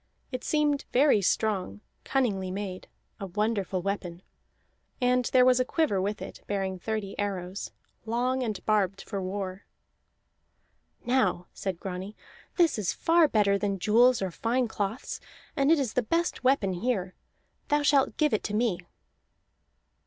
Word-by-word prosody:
It 255 -1 -4
seemed 295 -2 +1
very 265 -4 +4
strong, 185 - 0 0.2
cunningly 205 -9 0
made: 190 -1 -5 0.3
a 195 - -5
wonderful 200 -2 -1
weapon. 185 -3 -4 0.8
And 250 -1 +2
there 250 +1 +4
was 255 0 +5
a - - +4
quiver 255 - +1
with 205 +2 -2
it, - - -9
bearing 190 -2 -2
thirty 215 0 -3
arrows, 195 -2 -3 0.4
long 250 +3 0
and 220 -5 -3
barbed 200 -3 +1
for 200 -2 -4
war. 190 0 -5 1.4
"Now," 220 -9 +1
said 190 -3 -4
Grani, 190 +2 -6 0.4
"this 335 - +3
is 195 - 0
far 330 -1 +4
better 200 -5 +2
than 200 -1 -1
jewels 230 +4 +4
or 190 - -2
fine 240 +7 0
cloths, 215 +2 -4 0.4
and 275 0 +2
it 330 - +6
is 265 -6 -1
the 250 - +2
best 335 +6 -1
weapon 255 -8 +2
here. 190 -2 -1 0.5
Thou 295 0 +2
shalt 280 -2 +3
give 300 -4 +2
it 215 - +2
to 210 - -2
me." 220 -5 +1
210 Hz, 145 wpm, -28 LUFS, 190-255 Hz, 1.4 s, it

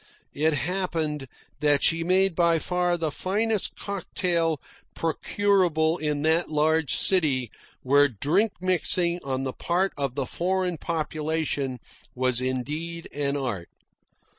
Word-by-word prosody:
It 155 +2 +2
happened 160 -4 -2 0.3
that 145 -2 +3
she 165 0 +3
made 190 +2 +3
by 170 -1 +3
far 180 +1 0
the 160 -2 -1
finest 210 +5 -1
cocktail 170 -5 -1 0.4
procurable 170 -1 +1
in 150 -1 -1
that 160 +2 +2
large 155 0 +2
city 140 - +2 0.3
where 145 +2 +5
drink 155 - +1
mixing 180 -1 +1
on 135 -1 -2
the 130 -1 -3
part 185 +3 0
of 135 -3 -2
the 140 -2 -1
foreign 180 +1 -1
population 155 -4 -2 0.4
was 130 -1 +1
indeed 150 +7 -3
an 145 0 -1
art. 120 -11 -3
160 Hz, 120 wpm, -26 LUFS, 145-180 Hz, 0.4 s, where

